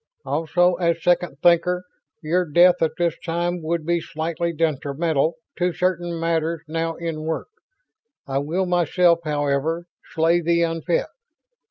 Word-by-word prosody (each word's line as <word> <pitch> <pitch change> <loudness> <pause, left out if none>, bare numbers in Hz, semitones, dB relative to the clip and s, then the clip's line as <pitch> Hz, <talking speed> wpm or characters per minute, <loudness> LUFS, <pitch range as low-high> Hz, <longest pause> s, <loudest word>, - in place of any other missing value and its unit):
Also, 175 +3 +2
as 170 -2 0
Second 175 -4 +1
Thinker, 175 +1 +3 0.4
your 175 +4 +1
death 175 +3 +4
at 160 - +1
this 170 -2 +1
time 175 +1 -1
would 160 0 -2
be 170 0 +1
slightly 165 +2 -3
detrimental 155 0 0 0.2
to 180 0 +1
certain 175 -1 -1
matters 165 -1 -1
now 165 +1 -2
in 165 -2 -4
work. 160 - -3 0.8
I 135 0 0
will 165 +7 -1
myself, 175 -1 +3
however, 150 +3 -1 0.3
slay 165 +2 +3
the 170 0 +2
unfit. 165 - 0
170 Hz, 135 wpm, -22 LUFS, 160-175 Hz, 0.8 s, death